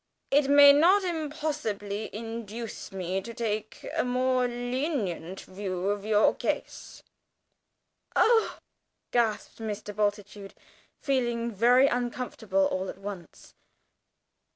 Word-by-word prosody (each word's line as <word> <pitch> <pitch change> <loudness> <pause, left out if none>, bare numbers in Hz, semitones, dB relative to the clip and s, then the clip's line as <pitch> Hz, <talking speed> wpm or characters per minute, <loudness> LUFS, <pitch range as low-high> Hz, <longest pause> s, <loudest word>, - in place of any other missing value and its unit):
It 280 0 +4
may 285 0 +9
not 360 +7 +5
impossibly 295 - -3
induce 225 0 -6
me 190 0 -3
to 230 +3 -9
take 215 -2 -4
a - - +2
more 255 0 +1
lenient 245 - -3
view 185 -1 -4
of 205 0 -4
your 215 -1 +4
case." - - -4 1.1
"Oh!" 455 -1 +3 0.5
gasped 230 -3 0
Mr. 210 -2 -5
Bultitude, 205 -1 -2 0.4
feeling 240 -4 0
very 240 +5 +5
uncomfortable 240 -6 -1
all 185 0 -2
at - - -7
once. 195 -3 -9
225 Hz, 105 wpm, -28 LUFS, 205-255 Hz, 1.1 s, may